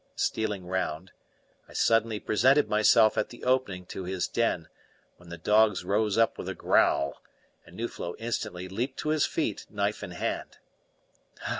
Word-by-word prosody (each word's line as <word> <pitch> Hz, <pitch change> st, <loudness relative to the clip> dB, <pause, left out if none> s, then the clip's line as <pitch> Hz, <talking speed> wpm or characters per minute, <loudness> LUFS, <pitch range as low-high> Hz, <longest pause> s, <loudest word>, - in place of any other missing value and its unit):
Stealing 105 Hz, -4 st, -1 dB
round, 90 Hz, -1 st, -3 dB, 0.6 s
I -, -, -14 dB
suddenly 115 Hz, -1 st, +2 dB
presented 130 Hz, +9 st, +3 dB
myself 110 Hz, +1 st, +4 dB
at -, -, -1 dB
the 120 Hz, -, -12 dB
opening 125 Hz, -8 st, 0 dB
to 95 Hz, -, -5 dB
his 90 Hz, 0 st, -2 dB
den, 105 Hz, -8 st, 0 dB, 0.5 s
when 90 Hz, -1 st, -16 dB
the 85 Hz, -, -7 dB
dogs 105 Hz, +2 st, +3 dB
rose 105 Hz, +2 st, +1 dB
up 115 Hz, 0 st, +2 dB
with -, -, -5 dB
a -, -, -4 dB
growl -, -, +2 dB, 0.5 s
and 85 Hz, -, -14 dB
Nuflo 115 Hz, -6 st, -4 dB
instantly 105 Hz, -5 st, -4 dB
leaped 120 Hz, +8 st, -3 dB
to 155 Hz, -, -2 dB
his 155 Hz, -1 st, +2 dB
feet, 130 Hz, -11 st, -2 dB
knife 100 Hz, 0 st, -2 dB
in 100 Hz, -, -6 dB
hand. 90 Hz, -, -4 dB
105 Hz, 155 wpm, -28 LUFS, 90-115 Hz, 0.6 s, myself